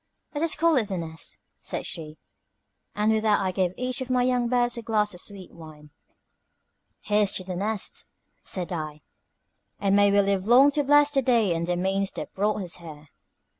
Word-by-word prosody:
"Let 295 +1 -2
us 330 - +3
call 330 -1 +3
it 225 -5 +2
The 190 -2 -3
Nest," 160 -1 -5 0.2
said - - -4
she; 155 -1 -7 0.8
and 210 +1 +2
with 220 0 +2
that 215 -1 +3
I 190 -1 -1
gave 185 -1 0
each 255 +1 -2
of 260 - -5
my 250 -1 +2
young 250 -1 +1
birds 245 0 +2
a 235 - -5
glass 215 -3 0
of 180 - -8
sweet 195 -3 -8
wine. 155 -2 -13 1.1
"Here's 210 -1 +2
to 185 - +1
'The 180 -1 -5
Nest,'" 210 +1 -3 0.4
said 180 -2 -4
I; 155 -2 -5 0.8
"and 200 -1 +2
may 205 0 +5
we 200 - +4
live 195 0 0
long 260 +5 +7
to 290 0 +1
bless 290 +1 +5
the 275 -2 +2
day 235 -7 +2
and 165 0 -2
the 175 0 0
means 195 +2 0
that - - -7
brought 210 +1 0
us 175 - -5
here." 155 -3 -12
205 Hz, 200 wpm, -25 LUFS, 180-245 Hz, 1.1 s, long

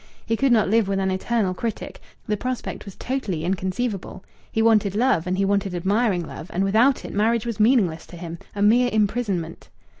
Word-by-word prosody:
He 225 - 0
could 270 +2 +2
not 225 -3 +4
live 220 0 +2
with 195 0 0
an 190 0 0
eternal 190 0 0
critic; 225 +3 -5 0.2
the 210 - 0
prospect 250 +2 -4
was 200 - -10
totally 205 -11 -3
inconceivable. 190 +2 -3 0.3
He - - -1
wanted 215 -3 +3
love, 225 -7 +2
and 185 +1 0
he 195 - +2
wanted 195 -2 0
admiring 190 0 +1
love, 155 +2 -9
and 185 - 0
without 225 +7 +3
it - - -7
marriage 225 +2 +1
was 230 -2 -4
meaningless 210 -8 +2
to 175 - -11
him, 170 -1 -7 0.2
a 200 - 0
mere 240 +4 +4
imprisonment. 205 -6 -1
205 Hz, 190 wpm, -23 LUFS, 185-230 Hz, 0.3 s, not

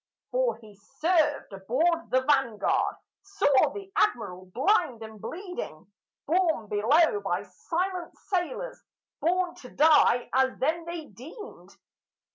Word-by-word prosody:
For - - +1
he 215 -2 -15
served 295 - 0
aboard 290 - 0
the 260 - +3
Vanguard, 260 -8 +1 0.3
saw 285 +1 +3
the 395 +2 -9
Admiral 185 - 0
blind 265 - +1
and 220 -2 -11
bleeding 350 - -7 0.3
Borne 325 -7 +1
below 300 - +3
by - - -2
silent 360 +1 -4
sailors, 410 +7 -3 0.4
borne 360 +1 +1
to 250 - -11
die 295 -5 +4
as 260 0 +2
then 325 +5 0
they 340 -2 -6
deemed. 295 - -12
310 Hz, 115 wpm, -27 LUFS, 240-360 Hz, 0.4 s, die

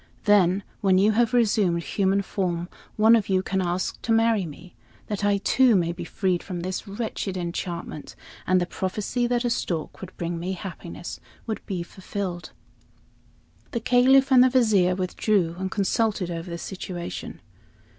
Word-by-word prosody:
Then, 200 -2 +4 0.2
when 190 -2 +3
you 205 +3 +4
have 230 +1 +2
resumed 205 -8 +2
human 195 +2 +1
form, 175 -3 -2 0.3
one 220 +2 +6
of 215 -4 0
you 190 -1 +2
can 190 0 -1
ask 180 +1 -2
to 230 - -2
marry 225 -4 +3
me, 170 +4 -12 0.3
that 210 -1 -4
I 205 0 +3
too 245 +3 +4
may 170 -3 +2
be 175 0 -6
freed 185 0 -1
from 180 -3 -5
this 185 +4 -4
wretched 200 -2 -4
enchantment; 170 -3 -5 0.3
and 185 0 +4
the 175 - 0
prophecy 205 +7 -2
that 245 0 0
a 240 - +1
stork 170 -8 -3
would 185 -1 -9
bring 170 0 -3
me 180 +3 -3
happiness 175 -2 -7 0.3
would 220 -2 -4
be 185 -4 -2
fulfilled." 185 -1 -5 1.2
The 235 - 0
Caliph 260 +3 +4
and 255 -1 +8
the 255 - +5
Vizier 215 -8 +3
withdrew 185 -1 0
and 190 0 -2
consulted 200 -2 0
over 165 +1 -5
the 170 - -4
situation. 180 -1 -6
190 Hz, 165 wpm, -25 LUFS, 175-220 Hz, 1.2 s, and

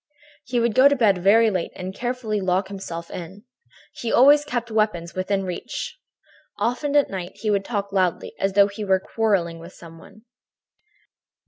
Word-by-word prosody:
"He 245 -1 -1
would 235 -1 +1
go 260 +4 +7
to 285 - +3
bed 210 -7 +3
very 220 +4 +4
late 185 -3 -2
and 185 +1 -6
carefully 240 -3 -3
lock 190 +1 0
himself 170 -4 -7
in. 185 +4 -8 0.5
He 235 - -4
always 290 +3 +6
kept 240 -5 -4
weapons 210 -6 0
within 195 +1 -1
reach. 335 - -6 0.6
Often 280 +5 -1
at 290 - +3
night 185 -2 -5
he 210 +1 -2
would 200 -1 +1
talk 200 -2 -3
loudly, 185 -3 0
as 195 0 0
though 200 0 +6
he 205 +1 -7
were 190 -2 +2
quarrelling 190 -5 -1
with 170 +2 -12
some 165 -1 -13
one. 215 +6 -17
200 Hz, 175 wpm, -23 LUFS, 185-235 Hz, 0.6 s, go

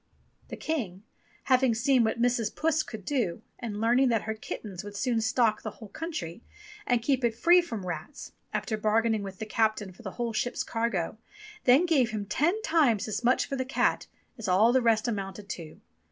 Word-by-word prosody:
The - - -7
King 215 - -3 0.4
having 255 -3 +3
seen 250 +2 +3
what 220 +1 0
Mrs. 240 -3 +1
Puss 315 -1 +1
could 220 -9 -8
do 225 -9 -1 0.2
and 215 -4 -5
learning 245 +4 +3
that 225 -3 +1
her 220 - -2
kittens 210 -3 -7
would 205 0 -9
soon 235 -1 +1
stock 220 0 +2
the 215 - -4
whole 215 0 -12
country, 205 - -5 0.5
and 245 -2 +2
keep 265 -1 +1
it 235 -2 +1
free 345 +9 +6
from 225 - -6
rats, 175 - -6 0.2
after 220 - -2
bargaining 220 +1 +2
with 195 -1 -7
the 220 - -5
captain 215 -2 0
for 185 - -16
the 190 -5 -7
whole 235 -2 -3
ship's 245 +3 -1
cargo, 225 -4 -2 0.5
then 260 +7 +6
gave 280 -9 +3
him 215 -2 -3
ten 340 - +1
times 285 - +3
as 215 +3 -3
much 250 +2 +3
for 275 - -4
the 260 - -1
cat 260 - 0 0.3
as 225 - -4
all 205 +6 +4
the 260 - +4
rest 225 -1 +2
amounted 200 -2 -4
to. 160 -3 -7
225 Hz, 195 wpm, -28 LUFS, 210-255 Hz, 0.5 s, free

